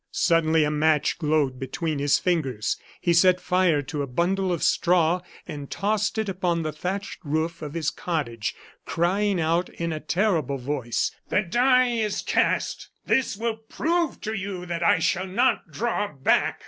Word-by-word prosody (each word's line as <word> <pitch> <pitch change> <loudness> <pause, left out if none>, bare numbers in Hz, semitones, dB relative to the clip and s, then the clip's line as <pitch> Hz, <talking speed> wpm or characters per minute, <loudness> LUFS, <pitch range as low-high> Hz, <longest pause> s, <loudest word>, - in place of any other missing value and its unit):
Suddenly 160 -1 +3
a 150 - +1
match 150 +1 +2
glowed 150 -5 +1
between 155 +3 -3
his 145 0 +3
fingers; 135 - 0 0.2
he 170 - +2
set 180 +2 +5
fire 180 -6 +2
to 145 +2 -4
a 140 - -2
bundle 180 +7 0
of 170 - -2
straw 175 0 +3 0.3
and 145 -2 -7
tossed 210 +2 -1
it 220 -1 0
upon 175 -3 -1
the 155 - -2
thatched 190 +6 -4
roof 160 +3 -2
of 150 0 -6
his 160 -3 0
cottage, 130 -11 -3 0.3
crying 190 +3 +1
out 165 +2 +1
in 170 -1 -4
a 155 - -4
terrible 160 -5 0
voice: 125 -2 -2 0.2
"The 205 - +2
die 250 +6 +3
is 220 -3 -1
cast! - - 0 0.2
This 260 -6 +1
will 225 0 -2
prove 330 +9 -1
to 220 - -3
you 195 -3 -4
that 170 -1 -4
I 170 - +4
shall 180 +3 0
not 240 0 +1
draw 210 +4 -1
back!" 135 -2 +1
170 Hz, 165 wpm, -25 LUFS, 150-195 Hz, 0.3 s, set